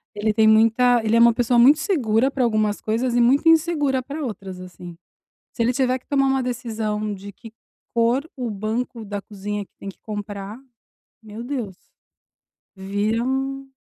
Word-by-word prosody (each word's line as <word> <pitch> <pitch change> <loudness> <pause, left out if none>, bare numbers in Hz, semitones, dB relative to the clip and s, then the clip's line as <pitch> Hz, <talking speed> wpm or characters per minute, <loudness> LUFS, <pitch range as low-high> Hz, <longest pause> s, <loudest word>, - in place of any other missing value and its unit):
ele 210 +1 0
tem 220 0 +4
muita 230 +2 +4
ele 220 +1 +1
é - - +5
uma 235 0 +6
pessoa 240 0 +2
muito 280 +5 +7
segura 260 - +1
pra 265 -2 -1
algumas 215 -2 +1
coisas 235 +3 -1
e 240 - +4
muito 270 +7 +3
insegura 305 -5 +2
pra 285 +4 -6
outras, 195 -6 -6
assim. 180 -1 -11 0.6
Se 235 - -2
ele 240 - +2
tiver 255 0 +1
que - - -35
tomar 275 -1 +2
uma 265 -1 +1
decisão 220 -4 -3
de 200 +1 -10
que 225 +2 -13 0.4
cor 245 +6 +1
o 245 -3 -3
banco 220 +3 -4
da 205 0 -5
cozinha 205 0 -6
que - - -49
tem 200 - -8
que 195 - -10
comprar, 205 0 -6 0.7
meu 220 +2 -8
Deus! 240 -8 -5 1.0
Vira 205 +4 -1
um 270 +1 -3
230 Hz, 175 wpm, -22 LUFS, 210-255 Hz, 1.0 s, muito